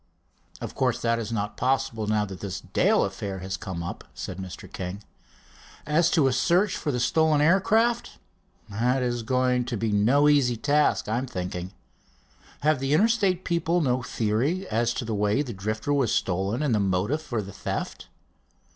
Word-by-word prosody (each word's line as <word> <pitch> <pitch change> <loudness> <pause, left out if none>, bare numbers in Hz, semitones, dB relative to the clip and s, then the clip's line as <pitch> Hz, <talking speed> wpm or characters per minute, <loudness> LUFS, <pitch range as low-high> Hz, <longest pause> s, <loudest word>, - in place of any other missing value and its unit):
"Of - - -6
course 125 -2 0
that 115 0 +2
is 115 0 -4
not 105 -2 -3
possible, 130 -3 0
now 105 -1 +1
that 95 -2 -8
this 95 -1 -5
Dale - - +2
affair 100 -2 -5
has 95 +1 -4
come 95 -4 -5
up," 85 - -6
said 95 - -6
Mr. 95 -1 -8
King. 95 +3 -5 0.8
"As 155 +3 +3
to 160 -5 +3
a 135 - +3
search 185 +9 +2
for 150 - -2
the 125 - -1
stolen 155 +4 +3
aircraft, 220 +9 +2 0.5
that 125 +5 0
is 120 -1 -1
going 125 +1 +1
to 120 -2 -3
be 110 0 -1
no 120 +9 +4
easy 135 -5 +3
task, 145 +1 +2
I'm 120 +5 -1
thinking. 90 -4 -5 0.9
Have 150 -1 +2
the 135 +2 +1
Interstate 200 -2 +2
people 170 0 +1
no 130 -5 +1
theory 125 - -1
as 120 +1 +1
to 120 - -3
the 110 - -3
way 105 +6 +1
the 125 -5 -6
Drifter 110 +7 -2
was 135 -6 +2
stolen, 100 +4 0
and 140 -5 +1
the 105 - +2
motive 100 +10 0
for 120 -7 -3
the 100 0 -9
theft?" - - -5
120 Hz, 175 wpm, -26 LUFS, 105-150 Hz, 0.9 s, no